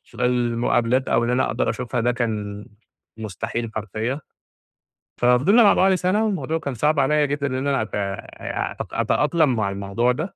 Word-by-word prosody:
في -, -, -5 dB
المقابلات 120 Hz, +1 st, +1 dB
أو -, -, +2 dB
إن 120 Hz, -, 0 dB
أنا 125 Hz, +1 st, +2 dB
أقدَر -, -, 0 dB
أشوفها 120 Hz, +1 st, -3 dB
ده 120 Hz, +2 st, +2 dB
كان 105 Hz, -4 st, -3 dB, 0.5 s
مستحيل 110 Hz, +2 st, -4 dB
حرفيًا، 110 Hz, +7 st, -3 dB, 1.0 s
ففضِلنا 135 Hz, -, +5 dB
مع 200 Hz, -, +6 dB
بعض 190 Hz, 0 st, +4 dB
سنة، 185 Hz, +4 st, +1 dB
والموضوع 165 Hz, -6 st, -1 dB
كان 140 Hz, -4 st, -4 dB
صعب 150 Hz, +5 st, +1 dB
عليّا 150 Hz, +2 st, +3 dB
جدًا 140 Hz, 0 st, -2 dB
إن 130 Hz, +2 st, -2 dB
أنا 135 Hz, -5 st, +1 dB
أت 110 Hz, -, -4 dB
أ 100 Hz, -1 st, -4 dB
أت -, -, -5 dB
أتأقلم 150 Hz, -3 st, +2 dB
مع 105 Hz, -3 st, 0 dB
الموضوع 100 Hz, +5 st, 0 dB
ده، 155 Hz, +9 st, -4 dB
125 Hz, 170 wpm, -22 LUFS, 110-150 Hz, 1.0 s, مع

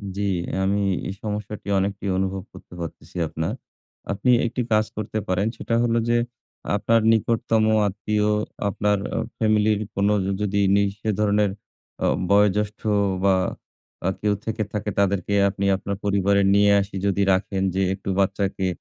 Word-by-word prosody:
জি, 100 Hz, -, -3 dB, 0.4 s
আমি 100 Hz, +1 st, +1 dB, 0.3 s
এই -, -, -3 dB
সমস্যাটি 105 Hz, -1 st, -5 dB
অনেকটি 100 Hz, +1 st, -2 dB
অনুভব 95 Hz, 0 st, -2 dB
করতে 95 Hz, -, -14 dB
পারতেছি 85 Hz, +2 st, -8 dB
আপনার। 80 Hz, +1 st, -3 dB, 0.6 s
আপনি 105 Hz, +6 st, +1 dB
একটি 125 Hz, +2 st, -2 dB
কাজ 110 Hz, 0 st, +4 dB
করতে 110 Hz, +1 st, -3 dB
পারেন। 95 Hz, +3 st, +1 dB
সেটা 115 Hz, -, -2 dB
হলো 115 Hz, 0 st, +2 dB
যে 120 Hz, -, +3 dB, 0.6 s
আপনার 110 Hz, +3 st, +2 dB
নিকটতম 115 Hz, 0 st, +2 dB, 0.2 s
আত্মীয় 105 Hz, +1 st, -1 dB, 0.4 s
আপনার 105 Hz, +1 st, +1 dB, 0.4 s
ফ্যামিলির 110 Hz, -1 st, +2 dB, 0.2 s
কোন 100 Hz, +1 st, +2 dB, 0.3 s
যদি 100 Hz, 0 st, 0 dB, 0.2 s
নি 100 Hz, -, +4 dB, 0.2 s
সে 110 Hz, -, -3 dB
ধরনের 105 Hz, -1 st, +2 dB, 0.5 s
আ -, -, +3 dB, 0.2 s
বয়োজ্যেষ্ঠ 105 Hz, +1 st, +2 dB, 0.4 s
বা 95 Hz, -1 st, +4 dB, 0.7 s
আ -, -, +3 dB
কেউ 105 Hz, -1 st, +2 dB
থেকে 110 Hz, -1 st, -1 dB
থাকে 105 Hz, 0 st, -2 dB
তাদেরকে 100 Hz, 0 st, +1 dB, 0.2 s
আপনি 100 Hz, 0 st, -3 dB
আপনার 100 Hz, +1 st, -4 dB
পরিবারে 100 Hz, 0 st, +2 dB
নিয়ে 100 Hz, 0 st, +5 dB
আসি 100 Hz, 0 st, -7 dB
যদি 100 Hz, 0 st, +1 dB
রাখেন। 95 Hz, 0 st, -1 dB
যে 95 Hz, -, +1 dB
একটু 95 Hz, 0 st, -6 dB
বাচ্চাকে 95 Hz, 0 st, 0 dB
100 Hz, 145 wpm, -23 LUFS, 100-105 Hz, 0.7 s, নিয়ে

